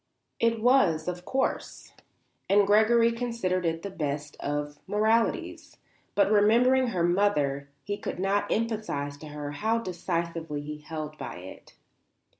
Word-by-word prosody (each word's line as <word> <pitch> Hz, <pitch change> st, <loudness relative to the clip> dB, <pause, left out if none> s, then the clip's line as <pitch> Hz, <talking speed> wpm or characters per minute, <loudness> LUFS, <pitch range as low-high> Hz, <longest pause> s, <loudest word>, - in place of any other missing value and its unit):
It 230 Hz, -1 st, +2 dB
was, 180 Hz, -12 st, +4 dB
of 180 Hz, 0 st, -4 dB
course, 265 Hz, 0 st, -2 dB, 0.6 s
and 200 Hz, +1 st, +5 dB
Gregory 225 Hz, +3 st, +5 dB
considered 230 Hz, -7 st, -1 dB
it 165 Hz, 0 st, -2 dB
the 200 Hz, -, -5 dB
very -, -, -17 dB, 0.2 s
best 145 Hz, 0 st, -8 dB
of 145 Hz, 0 st, -3 dB
moralities; 220 Hz, +2 st, 0 dB, 0.4 s
but 200 Hz, 0 st, +3 dB
remembering 240 Hz, +5 st, +4 dB
her 185 Hz, -7 st, -1 dB
mother 150 Hz, -7 st, +1 dB
he 205 Hz, 0 st, -3 dB
could -, -, -5 dB
not 195 Hz, +2 st, 0 dB
emphasize 215 Hz, -11 st, -2 dB
to 155 Hz, -, -10 dB
her 145 Hz, -1 st, -6 dB
how 220 Hz, +10 st, 0 dB
decisively 170 Hz, -6 st, -3 dB
he 150 Hz, +1 st, -6 dB
held 155 Hz, 0 st, -7 dB
by -, -, -6 dB
it. 90 Hz, +2 st, -12 dB
185 Hz, 140 wpm, -27 LUFS, 150-220 Hz, 0.6 s, and